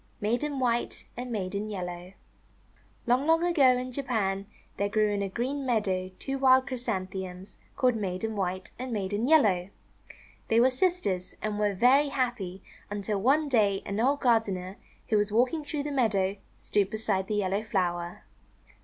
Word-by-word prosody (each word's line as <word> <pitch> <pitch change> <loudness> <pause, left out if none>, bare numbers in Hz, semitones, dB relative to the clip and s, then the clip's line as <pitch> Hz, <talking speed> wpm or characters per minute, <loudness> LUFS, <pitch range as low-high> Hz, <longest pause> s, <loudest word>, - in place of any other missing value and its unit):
MAIDEN 245 +7 -1
WHITE 240 -2 -1
AND 245 +1 -5
MAIDEN 200 0 -3
YELLOW 190 -4 -3
Japanese 180 +1 -8 0.9
Tale 245 0 +4
LONG, 275 +4 -4
long 325 +1 +4
ago, 280 -8 +4
in 255 0 -4
Japan, 210 -7 -1 0.3
there 200 0 0
grew 215 0 +2
in 205 -1 -1
a 200 - -2
green 260 +7 -2
meadow 200 -7 0
two 270 0 -4
wild 260 -1 +5
Chrysanthemums, 190 -7 -5 0.2
called 250 -2 +2
Maiden 210 +1 -3
White 185 -1 -3
and 255 0 -4
Maiden 205 +2 -1
Yellow. 205 - +4 0.8
They 225 - +3
were 255 +2 +5
sisters, 255 - 0
and 210 -1 -3
were 205 -1 +1
very 265 +8 +5
happy 240 -9 -2 0.3
until 205 0 -2
one 290 +7 +3
day 205 -7 +2
an 200 +2 -3
old 275 +5 +2
gardener, 200 -6 +1 0.3
who 215 - +3
was 205 0 +1
walking 255 +8 +2
through 290 0 -3
the 295 - -3
meadow, 205 -7 +1 0.2
stooped 200 -2 0
beside 205 -3 -1
the 210 - -1
yellow 200 0 0
flower. 175 -5 -2
215 Hz, 160 wpm, -28 LUFS, 195-255 Hz, 0.9 s, wild